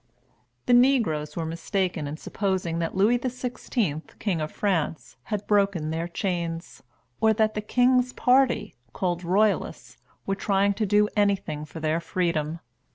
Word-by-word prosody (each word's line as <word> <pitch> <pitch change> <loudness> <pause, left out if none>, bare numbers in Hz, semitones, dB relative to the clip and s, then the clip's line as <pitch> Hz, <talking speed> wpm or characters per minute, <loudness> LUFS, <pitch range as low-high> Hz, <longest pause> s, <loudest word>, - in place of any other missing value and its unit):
The 245 - +3
negroes 230 - +3
were 165 - -2
mistaken 170 0 -2
in 150 +2 -5
supposing 185 -3 -2
that 165 +1 -2
Louis 215 +6 +3
XVI., 245 - -2 0.2
king 185 -7 -1
of 155 - -3
France, 165 -6 -2
had 210 -2 -3
broken 200 -7 +1
their 165 +1 -2
chains, 170 -2 -3 0.4
or 220 0 +4
that 215 0 +1
the 210 - -2
king's 250 +3 +3
party, 255 0 +2 0.2
called 175 -1 -2
Royalists, 200 +4 0 0.3
were 195 - 0
trying 200 0 +1
to 215 +1 -1
do 210 +1 +4
anything 195 -8 0
for 160 - -9
their 155 +1 0
freedom. 170 -2 -1
195 Hz, 145 wpm, -26 LUFS, 165-215 Hz, 0.4 s, or